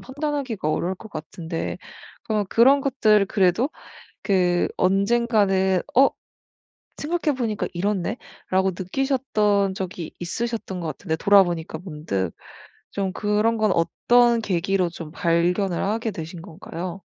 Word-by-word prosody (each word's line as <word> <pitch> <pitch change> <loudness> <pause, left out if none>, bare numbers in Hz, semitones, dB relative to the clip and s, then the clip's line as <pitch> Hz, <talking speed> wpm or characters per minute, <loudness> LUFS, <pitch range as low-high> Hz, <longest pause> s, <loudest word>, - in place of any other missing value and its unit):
판단하기가 270 - -3
어려울 175 +4 -1
것 220 +3 -12
같은데 165 +1 -5 0.5
그럼 215 -2 0
그런 270 +5 +5
것들 220 -7 +3
그래도 195 - +2 0.6
그 180 -3 +2
언젠가는 195 -2 +2
'어 270 +3 +7 0.9
생각해 310 -2 -1
보니까 220 -4 -1
이렇네.'라고 190 0 -1
느끼셨던 210 -3 +1
적이 180 -3 -5
있으셨던 205 +1 -4
것 165 - -4
같은데 160 +1 -3
돌아보니까 175 -4 +3
문득 150 - -3 0.6
좀 195 -2 -2
그런 210 +2 +1
건 215 -3 +2
어떤 240 +7 +3
계기로 190 -1 0
좀 165 -2 -9
발견을 175 +2 +1
하게 225 +3 -1
되신 165 -2 -7
건가요? 180 +1 -7
195 Hz, 275 characters per minute, -23 LUFS, 175-230 Hz, 0.9 s, 어